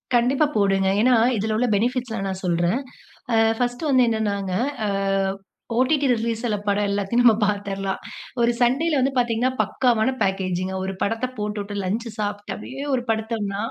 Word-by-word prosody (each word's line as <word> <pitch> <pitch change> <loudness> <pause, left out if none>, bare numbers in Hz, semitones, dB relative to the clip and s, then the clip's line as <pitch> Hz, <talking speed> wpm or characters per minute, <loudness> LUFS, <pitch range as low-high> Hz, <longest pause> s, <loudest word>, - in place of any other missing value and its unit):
கண்டிப்பா 260 +5 +3
போடுங்க. 195 -2 +2
ஏன்னா, 250 +1 +5 0.2
இதில 215 +1 -1
உள்ள 245 +1 +1
பெனிஃபிட்ஸ்லாம் 235 -1 -1
நான் 190 0 -4
சொல்றேன். 175 +7 +1 0.5
ஆ - - +4 0.2
ஃபர்ஸ்ட்டு 245 +5 -1
வந்து 255 -2 +5
என்னனாங்க 200 -4 -1 0.3
ஆ - - 0 0.9
ஓடிடி 280 +3 +2
ரிலீஸ்ல 230 -1 -1
படம் 205 0 +1
எல்லாத்தையும் 205 +4 +1
நம்ம 230 -3 +7
பார்த்திர்லாம். 200 -2 -2 0.4
ஒரு 235 +1 +4
சண்டேல 280 +5 +2
வந்து 270 +1 +1
பார்த்தீங்கன்னா, 240 +1 +1
பக்காவான 245 0 +1
பேக்கேஜி 185 -2 -1
ங்க. 190 - -4
ஒரு 195 - -3
படத்த 225 +4 0
போட்டு 210 0 -2
விட்டு 205 0 -6
லஞ்ச் 225 +5 -2
சாப்பிட்டு 205 0 -3
அப்பிடியே 270 +6 -7
ஒரு 245 - -1
படுத்தம்ன்னா 220 -2 -2
220 Hz, 155 wpm, -23 LUFS, 200-245 Hz, 0.9 s, நம்ம